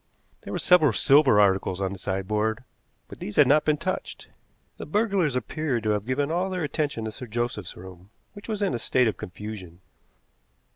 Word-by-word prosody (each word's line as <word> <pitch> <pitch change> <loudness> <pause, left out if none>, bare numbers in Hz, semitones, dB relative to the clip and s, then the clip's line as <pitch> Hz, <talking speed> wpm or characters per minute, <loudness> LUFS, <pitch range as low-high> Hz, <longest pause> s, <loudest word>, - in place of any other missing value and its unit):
There - - -9
were - - -2
several 155 -9 +4
silver 135 -3 +5
articles 95 -2 +2
on 95 0 -2
the 95 - -9
sideboard, 105 +5 -2 0.4
but - - -12
these 105 - -6
had 150 - +6
not 150 +4 +4
been 150 -1 +2
touched. - - -5 0.5
The - - -8
burglars 195 - +1
appeared 125 -1 -2
to 110 - +1
have 105 +1 -2
given 140 +3 0
all 180 +3 0
their 185 -2 -3
attention 145 -6 -2
to 110 - -4
Sir 125 - -9
Joseph's 120 -4 -3
room, 95 +1 -12 0.2
which 205 +1 -11
was 210 -2 -2
in 195 - 0
a 120 - -2
state 125 0 +2
of 110 - -1
confusion. 95 -3 -8
120 Hz, 190 wpm, -25 LUFS, 105-150 Hz, 0.5 s, had